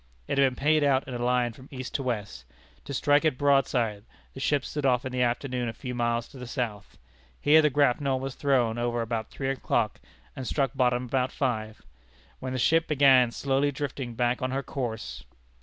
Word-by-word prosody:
It - - 0
had 135 -1 +5
been 125 - -10
paid 150 +3 +2
out 135 -2 +2
in 130 - -6
a 120 0 -3
line 125 -1 +1
from 130 +4 -14
east 130 -2 -7
to - - -1
west. 105 - -4 0.4
To - - -7
strike 145 +1 +3
it 155 -5 +1
broadside, 125 -7 +2 0.3
the - - -9
ship 140 0 +1
stood 150 - -4
off 125 -2 +2
in 130 - -3
the 125 0 -1
afternoon 125 0 -1
a - - -5
few 125 +2 -6
miles 120 -1 -1
to 135 - -12
the 125 - -7
south. 110 -5 -4 0.4
Here 155 +2 +6
the 150 - +3
grapnel 140 -1 +2
was 135 0 -4
thrown 125 -5 +1
over 120 0 0
about 115 -1 -3
three 135 -1 -3
o'clock, 120 -5 -1 0.4
and 130 -2 -5
struck 135 -4 0
bottom 125 -1 +1
about 130 +1 0
five, 110 -5 -2 0.6
when 130 0 -4
the - - -2
ship 165 +6 +3
began 135 -4 +5
slowly 135 +3 0
drifting 135 -3 -5
back 120 +1 0
on 130 - -1
her 135 +1 -2
course. 120 -5 -5
130 Hz, 205 wpm, -27 LUFS, 120-140 Hz, 0.6 s, Here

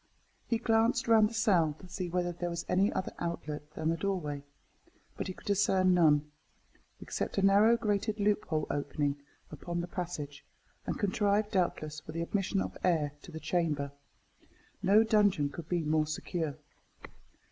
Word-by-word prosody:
He 230 - +1
glanced 225 +1 +2
round 220 -2 +6
the - - -11
cell 175 -9 +3
to 185 - -13
see 180 0 -4
whether 175 0 0
there 175 0 -4
was 170 0 -4
any 195 +3 +3
other 185 - -3
outlet 150 -3 -4
than 160 - -1
the 165 - 0
doorway, 165 -7 -2 0.7
but - - -4
he 185 - -4
could - - -17
discern 190 -2 +3
none, 150 -4 +4 0.7
except - - -4
a 195 - +2
narrow 205 +4 +6
grated 210 0 -1
loophole 200 -7 +1
opening 145 0 -1 0.3
upon 170 +3 -4
the 175 - -3
passage, 160 -6 -5 0.4
and - - -1
contrived, 205 +1 +1
doubtless, 155 -5 -1
for 155 - -10
the 165 +1 -2
admission 195 +2 0
of - - -5
air 160 -5 +2
to - - -12
the 160 - -6
chamber. 155 -5 -1 0.9
No 205 +4 +5
dungeon 205 -9 +3
could 155 +2 -9
be 175 -2 0
more 155 0 +1
secure. 155 -1 -3
175 Hz, 160 wpm, -31 LUFS, 155-200 Hz, 0.9 s, round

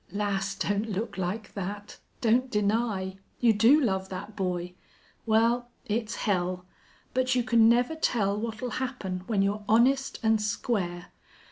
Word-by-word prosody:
Lass, 200 -1 -1
don't 205 +3 -1
look 210 +3 -3
like 195 +3 -4
that! 205 +1 -6 0.2
Don't 245 +2 +3
deny. 205 -3 0 0.2
You 235 -2 +5
do 230 +8 +6
love 190 -8 0
that 205 +3 -7
boy.... 180 -2 -2 0.5
Well, 230 +2 +2 0.2
it's 220 +1 -2
hell. 180 -2 -1 0.5
But 255 0 +1
you 250 - +2
can 230 -2 +5
never 245 +5 +3
tell 220 -10 +1
what'll 225 +3 -4
happen 190 -8 -3
when 205 -4 +2
you're 205 +1 -1
honest 265 +5 +3
and 220 -1 +3
square. 205 -4 -2
210 Hz, 140 wpm, -28 LUFS, 195-235 Hz, 0.5 s, do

